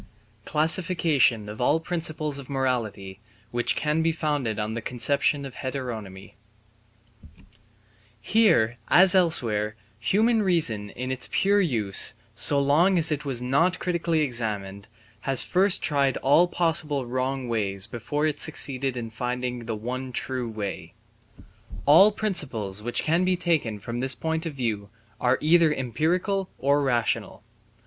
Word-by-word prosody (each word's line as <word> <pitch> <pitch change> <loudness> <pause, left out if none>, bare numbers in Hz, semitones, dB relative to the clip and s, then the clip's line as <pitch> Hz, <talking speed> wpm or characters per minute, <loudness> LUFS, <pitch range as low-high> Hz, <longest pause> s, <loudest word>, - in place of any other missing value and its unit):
Classification 155 - +2
of 105 +3 -7
all 145 +6 +3
Principles 155 -4 -2
of 135 - -10
Morality 115 -8 -3 0.3
which 120 0 0
can 150 +2 0
be 165 0 +2
founded 145 -9 -2
on 105 0 -3
the 115 - -4
Conception 140 +5 -1
of 135 - -8
Heteronomy 115 -9 -6 1.9
Here 120 - +2
as 185 +1 +7
elsewhere 115 - +2 0.2
human 220 - +2
reason 150 - +1
in 130 +5 -5
its 130 -1 -4
pure 200 +1 +2
use, 110 - 0 0.2
so 140 +5 +3
long 160 +7 +3
as 160 -2 +4
it 150 0 -2
was 125 -3 -2
not 165 +8 +2
critically 170 -2 -1
examined, 105 -7 -3 0.3
has 135 +3 +1
first 190 +1 +1
tried 140 -3 +1
all 150 +6 +4
possible 155 -6 0
wrong 130 +1 -3
ways 100 -4 -2
before 120 +7 -3
it 150 -2 -1
succeeded 135 -4 -2
in 115 -2 -5
finding 125 +1 -4
the 115 - -2
one 125 +4 -5
true 125 -1 -3
way. 105 -3 -6 0.9
All 170 +9 +7
principles 130 - -2
which 120 +2 -1
can 165 +3 +1
be 185 0 +1
taken 160 -12 0
from 115 +4 -6
this 130 +1 +1
point 160 +1 -3
of 155 - -6
view 110 -6 -3 0.3
are 125 +1 +2
either 165 +1 +4
empirical 170 - -1
or 140 +2 +2
rational. 120 -5 -1
135 Hz, 140 wpm, -25 LUFS, 115-160 Hz, 1.9 s, as